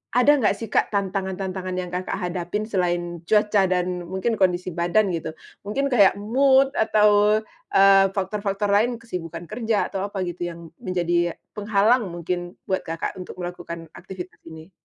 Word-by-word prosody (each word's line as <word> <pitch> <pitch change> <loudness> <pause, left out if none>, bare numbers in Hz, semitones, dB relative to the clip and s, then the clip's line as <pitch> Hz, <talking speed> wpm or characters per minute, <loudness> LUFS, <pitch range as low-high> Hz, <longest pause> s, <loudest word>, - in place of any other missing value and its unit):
Ada 285 +3 +5
nggak 210 -3 +2
sih 225 -1 -8
Kak - - +3
tantangan-tantangan 190 -2 -3
yang 180 -1 -4
Kakak 180 +1 -3
hadapin 180 +3 -3
selain 175 -4 -1
cuaca 210 -2 +3
dan 180 -1 -1
mungkin 190 +5 -2
kondisi 180 -1 +1
badan 175 +4 +1
gitu? 160 -1 -4 0.3
Mungkin 275 +6 -1
kayak 205 -6 +5
mood 265 +6 +3
atau, 210 0 +4 0.3
eee, 195 0 +7
faktor-faktor 200 +1 -1
lain, 225 +5 +3
kesibukan 175 -7 -7
kerja 220 +3 -1
atau 195 0 -2
apa 195 -2 -4
gitu 175 0 -4
yang 170 -1 -9
menjadi 175 -2 0 0.2
penghalang 215 +2 +2
mungkin 175 +1 -4 0.2
buat 190 - -1
Kakak 165 +3 -4
untuk 180 - -8
melakukan 170 -2 -7
aktivitas 185 0 -9
ini? 160 +2 -11
190 Hz, 150 wpm, -23 LUFS, 175-210 Hz, 0.3 s, eee